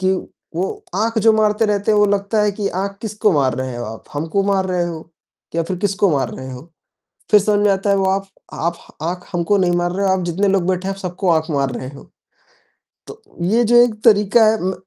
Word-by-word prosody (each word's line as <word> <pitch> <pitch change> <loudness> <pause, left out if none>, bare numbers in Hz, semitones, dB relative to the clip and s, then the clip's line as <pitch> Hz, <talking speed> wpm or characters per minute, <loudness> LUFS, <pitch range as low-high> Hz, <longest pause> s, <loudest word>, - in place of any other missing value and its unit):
कि 190 0 +2 0.4
वो 185 - 0 0.3
आँख 225 +2 0
जो 220 - +8
मारते 215 0 +2
रहते 205 0 0
हैं 210 - +3
वो 205 - +5
लगता 205 +1 0
है 210 - +2
कि 200 0 -2
आँख 200 0 -4
किसको 210 -2 0
मार 135 -4 +2
रहे 130 -2 -4
हो 120 - -5
आप? 110 +1 -8
हमको 160 +7 -1
मार 195 -1 +1
रहे 180 -2 0
हो? 165 -1 -8 0.4
या 165 - +1
फिर 180 +2 -4
किसको 200 -1 +1
मार 135 - -1
रहे 130 0 -8
हो? 135 +7 -11 0.6
फिर 210 - +8
समझ 205 0 +1
में 200 - +5
आता 195 +1 -2
है 200 - +4
वो 195 - +1
आफ 195 0 -2 0.3
आफ 170 +1 -2 0.3
आँख 180 +2 -4
हमको 175 +4 +1
नहीं 180 -2 +2
मार 175 0 0
रहे 195 +2 -1
हो, 190 - +3
आप 185 -1 -1
जितने 180 +4 0
लोग 190 -2 +1
बैठे 185 0 -1
हैं 195 - -1
आप - - -13
सबको 180 0 -2
आँख 160 0 +1
मार 140 -2 0
रहे 130 - -6
हो। - - -14 1.0
तो 450 - -12 0.2
ये 225 +7 +2
जो 240 +2 +3
एक 235 - -2
तरीका 210 +1 +5
है 220 +1 +3
म 190 - 0
195 Hz, 240 wpm, -19 LUFS, 170-205 Hz, 1.0 s, जो